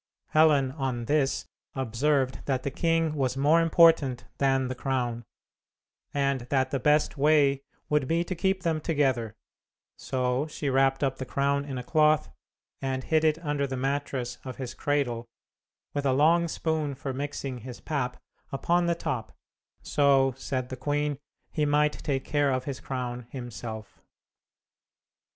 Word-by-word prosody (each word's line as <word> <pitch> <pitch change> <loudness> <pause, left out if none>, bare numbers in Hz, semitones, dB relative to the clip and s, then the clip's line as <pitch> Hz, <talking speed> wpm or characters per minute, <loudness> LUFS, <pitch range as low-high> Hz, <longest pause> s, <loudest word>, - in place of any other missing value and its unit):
Helen, 150 -4 +4
on 130 -4 -3
this, 140 0 +1 0.3
observed 130 +2 0
that 130 -2 0
the 140 - -2
king 165 0 +1
was 135 -3 -1
more 150 +5 +4
important 160 -8 +4
than 135 -1 +2
the 130 - -3
crown, 125 -3 -2 0.9
and 140 -1 +1
that 130 -2 +1
the 135 - 0
best 150 +2 +2
way 140 -2 +4 0.3
would 150 -3 +1
be 165 +3 +1
to 180 - -4
keep 190 +1 0
them 160 -3 0
together; 130 -9 0 0.6
so 130 +2 -1
she 150 -2 -3
wrapped 135 +1 +2
up 135 -1 0
the 130 - -3
crown 140 0 0
in 135 -3 -5
a 125 - -4
cloth, 155 +2 +3 0.5
and 130 -1 -2
hid 160 -1 +2
it 155 -1 +3
under 145 -1 0
the 130 -1 -4
mattress 135 -2 -2
of 130 -2 -6
his 130 -3 -5
cradle, 125 -5 -1 0.7
with 145 -1 -1
a 130 - +3
long 165 +5 +4
spoon 155 -3 -1
for 135 0 -5
mixing 135 -2 -4
his 125 +1 -9
pap 130 -5 -2 0.3
upon 170 +5 +1
the 170 - +2
top, 135 -10 -4 0.5
so, 135 -2 +3
said 130 -1 -3
the 130 - -4
queen, 145 +1 -1 0.3
he 150 - 0
might 150 +1 +3
take 135 -3 -3
care 145 -2 +2
of 130 -1 0
his 135 -1 -5
crown 125 -2 -4
himself. 115 -4 -7
140 Hz, 155 wpm, -27 LUFS, 130-150 Hz, 0.9 s, Helen